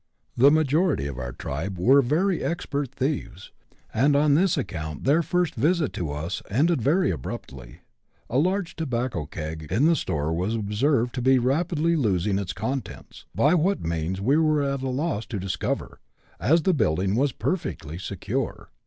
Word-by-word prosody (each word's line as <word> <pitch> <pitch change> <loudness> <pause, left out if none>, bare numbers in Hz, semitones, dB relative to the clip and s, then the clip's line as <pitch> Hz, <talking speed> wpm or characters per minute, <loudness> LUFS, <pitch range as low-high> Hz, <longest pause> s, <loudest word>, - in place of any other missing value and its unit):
The 135 +4 +6
majority 155 - +2
of 70 -3 -5
our 60 -1 -4
tribe 80 +9 -5
were 130 +10 +5
very 165 +8 +1
expert 145 -5 -2
thieves, 135 -8 -3 0.4
and 140 +6 +3
on 145 0 +4
this 175 +3 +3
account 80 - -4
their 145 +5 +4
first 180 -1 0
visit 155 +4 +1
to 80 -5 -3
us 80 +5 -4
ended 150 - +2
very 170 - +2
abruptly. 60 -1 -7 0.5
A 125 - +1
large 185 +2 0
tobacco 125 - -2
keg 80 0 -6
in 115 +10 +3
the 165 +1 +5
store 75 - -1
was 95 +7 -1
observed 115 +4 +1
to 125 - -3
be 130 +1 +4
rapidly 160 +6 +1
losing 100 - +1
its 95 -3 -3
contents, 110 +7 -5
by 115 - +4
what 180 - +1
means 85 +3 -2
we 130 +9 +2
were 155 -2 +2
at 140 -1 -1
a 135 - -2
loss 135 -3 -2
to 105 -6 -4
discover, 95 0 -3 0.4
as 160 +7 +3
the 190 - +3
building 95 - +1
was 135 +3 +2
perfectly 85 - -3
secure. 95 - -4
130 Hz, 165 wpm, -25 LUFS, 95-155 Hz, 0.5 s, The